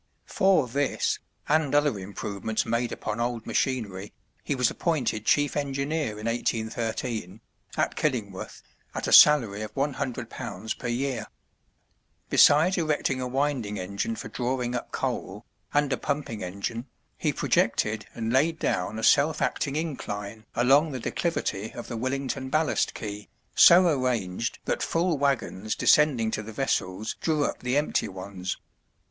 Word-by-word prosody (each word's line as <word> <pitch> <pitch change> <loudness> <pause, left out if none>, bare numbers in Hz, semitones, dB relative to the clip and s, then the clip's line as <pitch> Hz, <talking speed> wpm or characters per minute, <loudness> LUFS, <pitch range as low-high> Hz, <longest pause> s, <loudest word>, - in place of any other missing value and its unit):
For 185 -8 +3
this, 140 +3 0 0.3
and 150 -2 +2
other 145 -8 +2
improvements 100 +2 -3
made 115 +1 0
upon 105 - -4
old 120 -1 -2
machinery, 105 -7 -2 0.3
he 145 - -1
was 125 -3 +2
appointed 125 -10 -1
chief 145 -1 +3
engineer 140 -3 -1
in 105 - -7
1813, 115 -3 -2 0.4
at - - 0
Killingworth, 110 -10 -3 0.3
at - - -2
a - - -1
salary 120 -9 +7
of 110 0 -7
£100 120 -7 -3
per 125 - -4
year. 120 -2 -2 1.0
Besides 165 +6 +6
erecting 150 -5 0
a 125 - -2
winding 130 -5 -1
engine 100 - -3
for - - -7
drawing 125 -1 -2
up 125 - -4
coal, - - -3 0.3
and 145 -1 +2
a - - 0
pumping 140 -8 -3
engine, 100 +7 -4 0.3
he - - 0
projected 110 -1 +1
and 115 0 -2
laid 155 +5 +3
down 105 - -1
a 110 - -5
self 150 +5 +4
acting 140 -1 -1
incline 110 -9 -4
along 140 +6 +4
the 130 - -3
declivity 110 - -2
of - - -7
the 120 - -5
Willington 130 +2 -2
ballast 155 +3 +1
quay, 105 -1 -6 0.2
so 180 +2 +8
arranged 120 - 0
that - - -1
full 165 -2 0
wagons 115 -7 0
descending 130 -7 +4
to - - -2
the 110 +1 -8
vessels 105 -4 -1
drew 155 -3 +1
up - - -3
the 125 +2 0
empty 150 - +1
ones. 95 -1 -5
125 Hz, 140 wpm, -27 LUFS, 110-145 Hz, 1.0 s, so